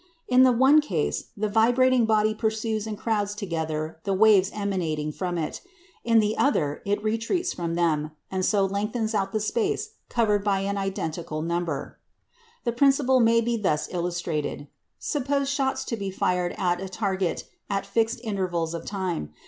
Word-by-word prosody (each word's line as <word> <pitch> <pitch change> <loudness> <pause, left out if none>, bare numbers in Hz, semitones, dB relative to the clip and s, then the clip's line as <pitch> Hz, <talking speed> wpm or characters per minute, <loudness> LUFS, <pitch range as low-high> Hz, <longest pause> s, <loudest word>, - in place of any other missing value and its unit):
In 250 0 +5
the 260 -1 +7
one 265 +5 +5
case, 175 - -2
the 215 +1 0
vibrating 245 +3 +4
body 215 0 +3
pursues 220 0 -1
and 215 -1 -4
crowds 205 -2 -1
together 160 -5 -3
the 195 -1 0
waves 200 -2 +5
emanating 170 -7 -2
from 175 +2 -3
it; 160 -2 -3 0.4
in 230 -1 +3
the 215 -1 +3
other, 150 - +1
it 205 +1 0
retreats 230 - -1
from 170 -1 -3
them, 155 -3 +1 0.2
and 190 -1 -1
so 200 0 +3
lengthens 210 +3 -2
out 195 -2 0
the 215 - 0
space 425 - -1 0.2
covered 210 -4 +1
by 200 -2 +1
an 200 +1 -1
identical 165 -5 -3
number. 170 -4 -3 0.6
The 235 - 0
principle 265 +1 +3
may 230 0 +4
be 235 0 0
thus 155 -8 0
illustrated. 170 -5 -3 0.3
Suppose 280 -1 -1
shots 270 -1 -1
to 230 - -2
be 200 -3 -4
fired 180 -1 0
at 175 -1 0
a 190 - -5
target 190 -3 -1 0.3
at 195 -1 -1
fixed 225 +4 0
intervals 180 -6 -2
of 170 - -5
time. 185 - -3
200 Hz, 165 wpm, -25 LUFS, 175-230 Hz, 0.6 s, the